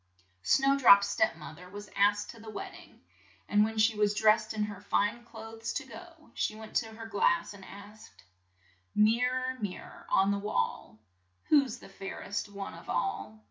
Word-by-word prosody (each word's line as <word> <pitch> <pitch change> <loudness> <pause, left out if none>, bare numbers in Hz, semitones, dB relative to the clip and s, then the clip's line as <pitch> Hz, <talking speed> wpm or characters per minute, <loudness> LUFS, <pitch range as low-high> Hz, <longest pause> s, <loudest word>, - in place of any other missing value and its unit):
Snow 275 - +3
drop's 200 -6 +8
step 325 +11 +1
moth 155 - -10
er 180 0 -12
was 205 +2 -9
asked 205 +1 +2
to 230 - -15
the 220 0 -10
wed 215 - -6
ding, - - -16 0.5
and 205 0 +4
when 220 +1 -2
she 215 +1 +4
was 210 0 +2
dressed 215 0 +3
in 215 -1 -1
her 205 -2 -6
fine 210 +3 0
clothes 225 -1 -7
to 295 - -3
go, 330 +3 -13
she 215 - -1
went 220 0 -11
to 225 - 0
her 225 0 -8
glass 200 -5 +1
and 195 -1 -13
asked: 210 - -13 0.7
"Mir 225 +4 +4
ror, 255 -1 -3
mir 200 -3 -4
ror - - -14
on 195 +1 +4
the 200 - 0
wall, 205 - -2 0.5
Who's 275 -6 +4
the - - -13
fair 195 0 -7
est 205 +1 -3
one 200 -1 -6
of - - -12
all?" 205 +2 -2
215 Hz, 190 wpm, -30 LUFS, 200-230 Hz, 0.7 s, drop's